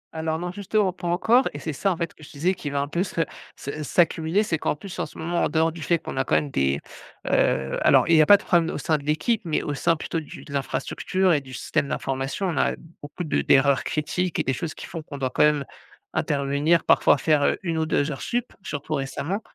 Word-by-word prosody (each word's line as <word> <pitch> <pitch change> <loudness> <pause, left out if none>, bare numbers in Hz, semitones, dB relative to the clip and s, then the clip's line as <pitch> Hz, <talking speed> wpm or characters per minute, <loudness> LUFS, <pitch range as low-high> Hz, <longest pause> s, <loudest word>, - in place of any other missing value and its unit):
Alors 160 0 -1
non, 175 +1 -4
justement, 200 0 0
pas 175 - -6
encore 225 +9 +3
et 145 - -6
c'est 155 +1 -4
ça, 195 +7 0
en 175 - -2
fait, 170 0 -3
que - - -17
je - - -11
te - - -15
disais 180 +6 +2
qui 150 - -5
va 140 0 -1
un 140 - -2
peu 170 +4 -1
se 170 -3 -2 0.3
se 145 +2 -6
s'accumuler. 165 +5 +2
C'est 160 -7 -1
qu'en - - 0
plus 190 +5 -9
en - - -1
ce - - -15
moment, 170 +2 -1
en - - +1
dehors 160 0 +2
du 165 0 -10
fait 170 +3 +2
qu'on 140 - -7
a 135 - +2
quand - - +1
même 145 - +1
des, 70 - +1 0.5
heu 65 0 +1
alors - - +5
il 165 - +5
y - - +8
a 150 - +4
pas 205 - +9
de - - -14
problème 170 -2 +2
au - - -3
sein 155 -2 0
de - - -12
l'équipe 155 +10 +1
mais 160 -3 -1
au 145 - -2
sein 165 +4 +2
plutôt 165 +1 -3
du 155 - -10
de 140 - -10
l'infrastructure 180 +6 0
et 145 - +2
du 130 -1 -12
système 140 - -1
d'information. 135 +9 -2
On 170 - -2
a - - +2 0.3
beaucoup 145 +5 -6
de 155 - 0
d'erreurs 135 0 +4
critiques 175 +3 -2
et - - +2
des 135 - 0
choses 160 +4 -4
qui - - -8
font 165 - -6
qu'on 150 -2 -9
doit 130 -2 -2
quand - - +3
même 150 -2 +3 0.5
intervenir, 145 +4 +1
parfois - - +5
faire, 150 +1 +2
heu, - - +2
1 165 -3 -1
ou 160 - 0
2 145 0 +1
heures 135 - -6
supplémentaires. 245 0 -2
Surtout 150 -4 -5
récemment 145 +8 -2
160 Hz, 260 wpm, -24 LUFS, 140-175 Hz, 0.5 s, pas